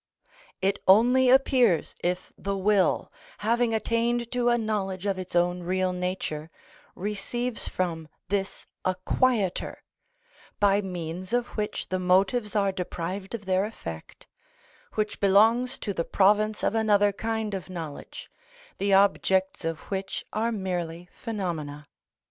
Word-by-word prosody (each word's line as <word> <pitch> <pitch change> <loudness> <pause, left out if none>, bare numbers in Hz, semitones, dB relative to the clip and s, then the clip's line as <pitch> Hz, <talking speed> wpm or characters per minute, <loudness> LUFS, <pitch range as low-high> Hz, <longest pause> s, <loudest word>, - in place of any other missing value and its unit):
It 195 +1 +2
only 245 +6 +6
appears 255 - +4
if 180 +1 -2
the 200 0 -3
will, 195 -2 +2 0.3
having 235 +1 +2
attained 230 +1 0
to 245 -1 +2
a 240 - +3
knowledge 205 -4 -2
of 195 -2 0
its 185 -1 -7
own 175 +1 +2
real 185 +1 0
nature, 180 -4 -3 0.5
receives 210 +4 -3
from 165 -3 -2 0.2
this 195 -1 -2 0.2
a 185 - +1
quieter, 225 -8 +1 0.8
by 205 0 +4
means 180 0 -5
of 245 0 +1
which 210 -1 -4
the 185 - -1
motives 195 +5 +2
are 200 -2 +3
deprived 185 +2 -4
of 205 -3 -8
their 185 0 +2
effect, 85 - -8 0.7
which 215 0 -1
belongs 225 +6 +4
to 200 - -3
the 170 - -1
province 210 +4 +2
of - - +2
another 205 -2 +3
kind 220 0 -2
of 185 -4 -5
knowledge, 165 -5 -7 0.5
the 200 0 +1
objects 190 -1 +3
of 165 -1 -3
which 190 0 -3
are 225 +2 0
merely 180 -4 -3
phenomena. 160 -10 -4
195 Hz, 130 wpm, -27 LUFS, 180-220 Hz, 0.8 s, only